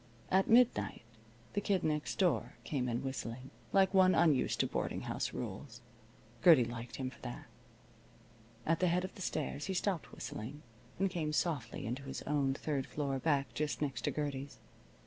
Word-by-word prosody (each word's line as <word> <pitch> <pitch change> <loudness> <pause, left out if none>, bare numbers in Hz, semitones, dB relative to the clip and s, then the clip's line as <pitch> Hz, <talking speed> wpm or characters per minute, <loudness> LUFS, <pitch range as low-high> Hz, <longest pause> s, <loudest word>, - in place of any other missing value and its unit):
At 190 +1 +3
midnight 240 - +4 0.5
the 205 - 0
Kid 195 -3 +1
Next 150 -1 -1
Door 125 - +1
came 125 +1 -1
in 120 +2 -1
whistling, 130 -1 -5 0.2
like 195 -1 +4
one 185 -1 +6
unused 155 -6 +3
to - - +2
boarding - - -2
house - - -2
rules. 120 +3 -6 0.6
Gertie 155 -9 +8
liked 120 0 -6
him 130 -1 -3
for - - -16
that. - - -6 1.2
At 165 0 +2
the 185 - +3
head 175 +1 +2
of 185 - -5
the - - -10
stairs 150 -4 -2
he 190 - -2
stopped 185 -3 -1
whistling 135 +8 -6 0.3
and 195 - +2
came 160 -5 -2
softly 150 - -1
into 125 +5 -3
his 135 -1 -6
own 140 -2 +1
third 140 -2 -2
floor 140 -3 -2
back 140 -1 +1
just 150 -1 -1
next 145 -3 -2
to - - +1
Gertie's. 140 -2 -3
145 Hz, 170 wpm, -34 LUFS, 130-175 Hz, 1.2 s, Gertie